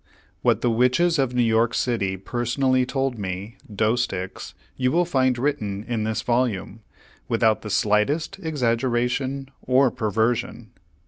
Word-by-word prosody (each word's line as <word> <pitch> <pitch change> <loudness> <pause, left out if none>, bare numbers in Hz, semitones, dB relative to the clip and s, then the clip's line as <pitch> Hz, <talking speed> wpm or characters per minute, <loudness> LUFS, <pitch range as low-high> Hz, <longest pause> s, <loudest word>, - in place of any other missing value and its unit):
What - - +2
the 120 - +2
Witches 130 +8 +2
of 130 -2 0
New 125 - +3
York 115 0 +2
City 100 -6 0
personally 125 +5 0
told 135 -3 -1
me, 100 +3 -5
Doesticks, 110 -3 -2 0.2
you 125 -1 +1
will 175 +2 +2
find 130 -6 +1
written 105 -7 -2
in 115 -2 -2
this 110 0 -2
volume, 120 -4 -1 0.5
without 110 -1 +2
the 105 - -7
slightest 105 - +1
exaggeration 130 -1 -1
or 130 0 +3
perversion. 110 +2 -1
120 Hz, 130 wpm, -23 LUFS, 110-130 Hz, 0.5 s, New